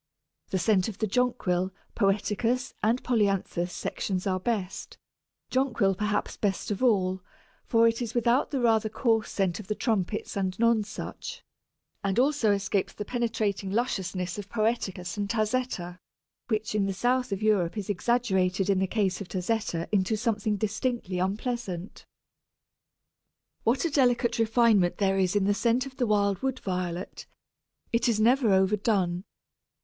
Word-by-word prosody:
The 190 - 0
scent 190 0 +2
of 220 - -6
the 220 - 0
Jonquil, 195 -5 0 0.2
Poeticus, 215 +5 0
and 230 +4 +1
Polyanthus 195 -6 0
sections 185 +1 -3
are 185 -1 0
best, 195 -2 -3 0.5
Jonquil 245 -7 +2
perhaps 210 +2 -2
best 205 0 -1
of 205 - -3
all, 190 -6 +2 0.5
for 230 0 +5
it 230 +1 0
is 230 -1 -4
without 240 +3 +2
the 275 - -1
rather 225 -2 +3
coarse 225 -1 +1
scent 190 -2 -1
of 205 - -9
the 210 - -1
Trumpets 215 -3 -1
and 190 -2 -1
Nonsuch, 225 -2 -1 0.6
and 195 +1 0
also 265 -4 +3
escapes 200 -1 0
the 210 - -6
penetrating 220 -5 -1
lusciousness 190 -4 -2
of 200 -1 -8
poeticus 215 -6 -1
and 200 -1 -2
tazetta, 215 -6 -1 0.5
which 220 0 -1
in 205 -2 +1
the 195 - -1
south 245 +4 0
of 195 +1 -2
Europe 205 -3 +2
is 205 - -3
exaggerated 195 -3 +1
in 190 - +2
the 190 - +1
case 195 -2 0
of 195 - -6
tazetta 185 -3 -2
into 205 +1 +2
something 215 -2 0
distinctly 215 -2 -2
unpleasant. 195 -1 -3 1.6
What 245 +8 +2
a 335 - 0
delicate 245 -4 +2
refinement 225 -5 +3
there 195 -1 +2
is 185 0 +1
in 200 -2 +3
the 205 - +3
scent 235 +4 +1
of 270 -1 -10
the 245 - +1
wild 200 -2 +2
Wood 265 -1 -1
Violet; 180 -1 -4 0.7
it 235 +1 +2
is 220 -2 +1
never 240 0 +4
overdone. 190 -2 +2
210 Hz, 150 wpm, -27 LUFS, 190-235 Hz, 1.6 s, for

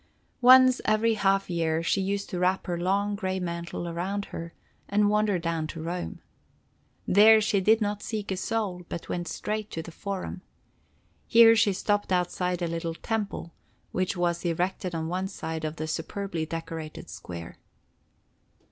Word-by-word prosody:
Once 255 0 +7
every 215 +1 +3
half 195 -2 +2
year 165 -2 0
she 195 +4 +1
used 200 +1 -2
to 180 - -4
wrap 185 +1 +1
her 175 - -2
long, 200 +4 0
gray 190 -2 -2
mantle 170 -1 -4
around 190 +4 -3
her, 165 0 -5 0.4
and 205 +1 +3
wander 210 -2 +2
down 165 -2 -2
to 165 - -7
Rome. 175 +2 -4 0.9
There 220 +3 +7
she 205 -2 +1
did 220 +4 +4
not 205 0 -1
seek 210 -3 -4
a 190 - -1
soul, 200 -3 -2
but 170 - -6
went 175 -1 -3
straight 215 0 -3
to 165 - -5
the 170 - -9
Forum. 190 +1 -5 0.9
Here 230 0 +8
she 220 -2 +4
stopped 205 +1 0
outside 180 0 0
a - - +1
little 165 0 -3
temple, 205 -5 -3 0.4
which 185 0 -1
was 175 -1 0
erected 180 +1 -1
on 160 0 -2
one 185 +3 -2
side 160 -5 -5
of 155 0 -3
the 155 - -4
superbly 165 +1 -3
decorated 165 -1 -6
square. 85 -2 -8
185 Hz, 160 wpm, -27 LUFS, 170-205 Hz, 0.9 s, Here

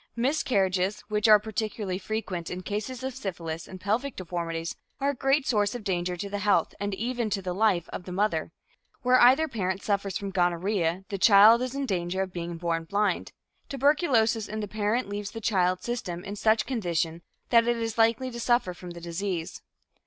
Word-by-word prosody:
Miscarriages, 200 -7 +1
which 210 +1 +2
are 215 -1 +9
particularly 210 -3 -3
frequent 190 -5 -4
in 180 +1 -5
cases 220 +6 -4
of 265 0 -3
syphilis 170 -9 -5
and 185 - -9
pelvic 230 +8 -1
deformities, 170 -2 -4 0.2
are 280 +1 +1
a - - -6
great 270 +2 +1
source 210 -2 +1
of 240 - -6
danger 180 -2 -1
to 200 - -4
the 205 0 -4
health 205 +1 +2
and 200 -1 -2
even 240 +1 -2
to 200 - -1
the 180 -2 -4
life 190 -4 +2
of 180 - -7
the 180 - -7
mother. 180 -4 0 0.5
Where 255 0 +5
either 265 +6 +6
parent 195 - -2
suffers 200 -2 -1
from 200 -1 -5
gonorrhea, 180 0 0
the 195 - -4
child 215 +4 +7
is 255 +1 -3
in 280 0 -1
danger 185 -3 -1
of 185 -1 -8
being 170 -1 -4
born 165 -1 -2
blind. 205 +4 0 0.4
Tuberculosis 260 - +2
in 215 - -5
the 210 - -3
parent 215 +4 -1
leaves 205 0 -4
the 225 - -7
child's 185 -4 +1
system 185 -8 -4
in 200 +1 -6
such 220 +1 +2
condition 170 - -1 0.3
that 230 -1 +5
it 240 0 +2
is 225 0 -3
likely 230 +3 +3
to 235 - -7
suffer 240 -6 +1
from 175 0 -10
the 170 0 -9
disease. 170 0 -4
205 Hz, 190 wpm, -27 LUFS, 180-230 Hz, 0.5 s, are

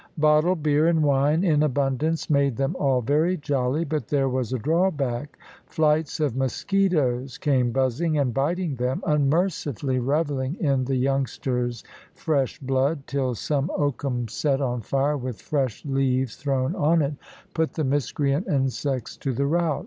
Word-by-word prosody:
Bottled 155 +2 +3
beer 150 +1 +3
and 165 -2 +3
wine 145 +4 +2
in 155 -6 +3
abundance 145 +2 0
made 140 -4 +2
them 135 0 -1
all 135 -3 +2
very 155 +9 +1
jolly, 145 +1 -1
but 155 0 -3
there 140 -2 +1
was 130 -3 -2
a 130 - 0
drawback. 145 - -1 0.3
Flights 155 0 +1
of 145 -6 0
mosquitoes 135 -3 0
came 130 -4 +1
buzzing 135 +5 0
and 135 -4 +1
biting 150 +2 -1
them, 125 +2 -2
unmercifully 145 - 0
revelling 140 +1 -1
in 135 -6 +1
the 135 +1 -1
youngster's 125 -2 -1 0.3
fresh 140 -4 -1
blood, 135 +2 0
till 130 -3 -1
some 145 +5 -1
oakum 135 -4 -1
set 135 +5 0
on 125 -3 -1
fire, 140 +6 0
with 125 -4 -5
fresh 135 -6 -2
leaves 130 -3 0
thrown 135 -2 -1
on 155 +2 +3
it, 140 +1 -1 0.4
put 160 -1 0
the 155 - -2
miscreant 145 +3 0
insects 135 -2 -1
to 135 - -2
the 140 +4 0
rout. 160 0 +1
140 Hz, 150 wpm, -24 LUFS, 130-155 Hz, 0.4 s, Bottled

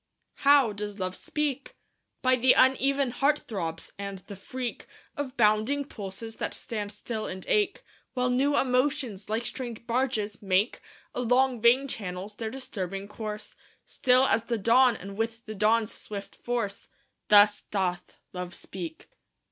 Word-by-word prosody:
How 280 -6 +5
does 205 0 -5
Love 185 0 -2
speak? 285 -3 -3 0.5
By 255 0 +5
the 255 +1 +5
uneven 270 0 +3
heart 280 +4 +2
throbs, 165 - -5
and 200 -1 -4
the 200 +2 -10
freak 245 +5 -5 0.3
Of 285 -3 -5
bounding 220 +6 +3
pulses 215 0 -7
that - - -2
stand 210 -3 -4
still 215 +1 -5
and 185 0 -6
ache, 415 -2 +1 0.3
While 250 0 +1
new 280 +3 +2
emotions, 255 -5 0
like 225 +2 -1
strange 235 -1 -5
barges, 235 -4 -1
make 195 +3 +1 0.3
Along 250 0 +2
vein 250 +4 +5
channels 195 -3 -5
their 220 +1 -4
disturbing 195 -6 -5
course; 210 0 -6 0.3
Still 255 0 +3
as 225 -3 +2
the 235 -1 -1
dawn, 235 +3 +5
and 195 0 -8
with 225 +1 -2
the 215 - -6
dawn's 215 +2 +2
swift 200 -2 -8
force 235 -5 -3 0.4
Thus 205 0 +6
doth 180 -3 -1 0.2
Love 180 -1 -5
speak. 170 -4 -7
225 Hz, 145 wpm, -28 LUFS, 200-255 Hz, 0.5 s, Thus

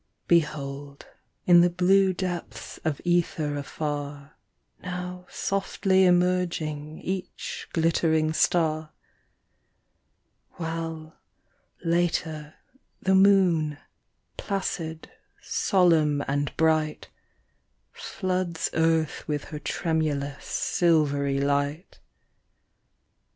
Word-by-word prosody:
Behold, 145 -4 -1 0.4
in 175 -1 +7
the 175 - +4
blue 190 +2 +3
depths 180 -1 -5
of 155 -4 -1
ether 165 -4 +1
afar, 145 0 -5 0.5
Now 180 0 -6
softly 195 -1 +1
emerging 175 -4 +1
each 190 0 -5
glittering 160 -1 +2
star; 155 -2 +1 1.6
While, 165 -1 -5 0.7
later, 165 -3 -1 0.4
the 190 - +1
moon, 185 -6 +4 0.6
placid, 165 -5 -4 0.3
solemn 160 -7 +2
and 145 +1 -1
bright, 155 -1 +1 0.8
Floods 185 -3 -3
earth 160 -1 +1
with 150 -2 -2
her 150 - -7
tremulous, 145 -3 -2
silvery 145 -5 +1
light. 145 +4 -1
160 Hz, 75 wpm, -26 LUFS, 150-180 Hz, 1.6 s, in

